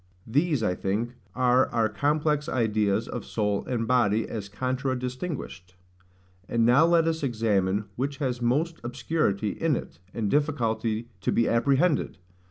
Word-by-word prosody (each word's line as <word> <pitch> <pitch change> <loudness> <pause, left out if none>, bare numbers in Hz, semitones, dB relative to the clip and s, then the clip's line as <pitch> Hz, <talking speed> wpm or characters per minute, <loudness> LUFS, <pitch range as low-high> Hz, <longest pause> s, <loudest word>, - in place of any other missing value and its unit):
These, 145 +1 +1
I 90 - +1
think, 105 +6 -2 0.2
are 125 0 +3
our 115 -1 +1
complex 150 +5 0
ideas 110 -3 +1
of - - -5
soul 105 -2 -1
and 115 -3 -1
body, 115 -4 +2
as 100 -3 -5
contradistinguished; 130 - -4 0.7
and 115 -1 +2
now 135 +8 +5
let 170 -1 +4
us 160 0 0
examine 105 -6 0
which 140 +3 -2
has 130 -4 -2
most 150 +8 0
obscurity 120 -4 -1
in 160 -4 0
it, 80 - -7
and 110 -1 -2
difficulty 115 -5 0
to - - 0
be 115 - +2
apprehended. 140 - +2
120 Hz, 140 wpm, -26 LUFS, 110-145 Hz, 0.7 s, now